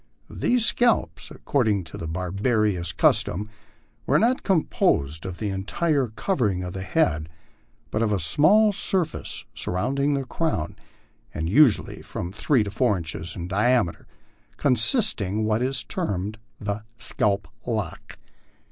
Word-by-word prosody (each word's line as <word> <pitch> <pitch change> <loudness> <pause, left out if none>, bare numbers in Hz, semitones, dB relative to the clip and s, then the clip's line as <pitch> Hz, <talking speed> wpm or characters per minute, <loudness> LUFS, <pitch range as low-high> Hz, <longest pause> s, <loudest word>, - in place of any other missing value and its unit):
These 240 -2 +2
scalps, 240 +1 +2
according 110 -8 0
to 80 - -11
the 80 - -6
barbarous 90 +1 0
custom, 90 +5 +1 0.6
were 140 - +4
not 240 +9 +2
composed 80 - +1
of 90 -2 -6
the 105 - -3
entire 135 - 0
covering 110 - -1
of 90 -1 -5
the 95 - -5
head, 80 - 0 0.6
but 110 - -1
of 110 -2 +1
a 100 - +1
small 155 - +5
surface 185 - -1
surrounding 140 +10 -1
the 135 - -1
crown, 150 - -2 0.6
and 80 - -2
usually 120 - +3
from 85 - -6
three 115 +4 +1
to 100 - -5
four 115 -2 +1
inches 85 0 -5
in 85 -1 -5
diame 105 0 +2
ter, - - -22 0.5
constituting 115 - +2
what 110 +1 +1
is 130 +1 0
termed 105 - -3 0.2
the 105 0 -4
scalp 100 -3 0 0.2
lock. - - -4
105 Hz, 135 wpm, -24 LUFS, 90-140 Hz, 0.6 s, small